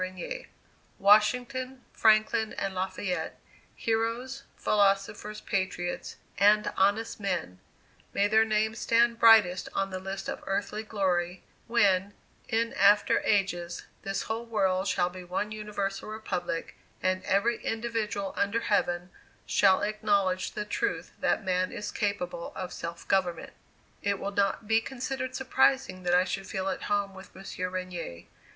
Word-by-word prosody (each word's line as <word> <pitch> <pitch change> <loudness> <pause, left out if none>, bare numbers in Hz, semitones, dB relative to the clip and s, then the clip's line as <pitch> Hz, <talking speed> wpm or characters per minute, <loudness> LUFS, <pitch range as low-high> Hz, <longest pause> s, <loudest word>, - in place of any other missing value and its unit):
Regnier: 185 - -6 0.5
"Washington, 250 +6 +3
Franklin, 220 0 +3
and 195 -1 -3
Lafayette 185 0 -3 0.4
heroes, 230 +4 -1 0.2
philosophers, 205 +1 +1
patriots, 185 -2 -2 0.2
and 210 +2 +4
honest 205 +4 +1
men: 180 - -2 0.5
May 200 - +2
their 220 +1 +5
names 220 0 0
stand 235 0 +3
brightest 215 -6 +6
on 195 0 0
the 185 - -3
list 190 +1 -5
of - - -5
earthly 200 +2 -1
glory, 185 -4 -1 0.2
when, 200 -4 +2 0.3
in 230 0 +1
after 205 +2 +5
ages, 175 -4 0 0.2
this 195 0 -2
whole 225 +1 -3
world 190 -4 +1
shall 180 -1 +1
be 185 0 -9
one 185 +4 -3
universal 210 -2 -4
republic, 185 -6 -4 0.3
and 185 0 +1
every 220 +5 +1
individual 225 -3 -2
under 205 +3 0
Heaven 175 -4 0 0.3
shall 195 0 +4
acknowledge 205 -3 +1
the 210 - -3
truth 405 - -2
that - - +1
man 185 0 +1
is 210 0 -5
capable 200 -5 -2
of 185 -1 -5
self 170 0 -6
government." 180 -4 0 0.5
It 200 -1 0
will 200 - -4
not 200 +1 0
be 225 +1 +4
considered 260 +1 -4
surprising 265 -7 +2
that 175 0 +2
I 180 - +5
should 195 +1 -4
feel 190 0 -2
at - - -3
home 200 -1 0
with 190 0 -13
Monsieur 185 -1 -5
Regnier. 180 - -5
200 Hz, 135 wpm, -29 LUFS, 185-220 Hz, 0.5 s, brightest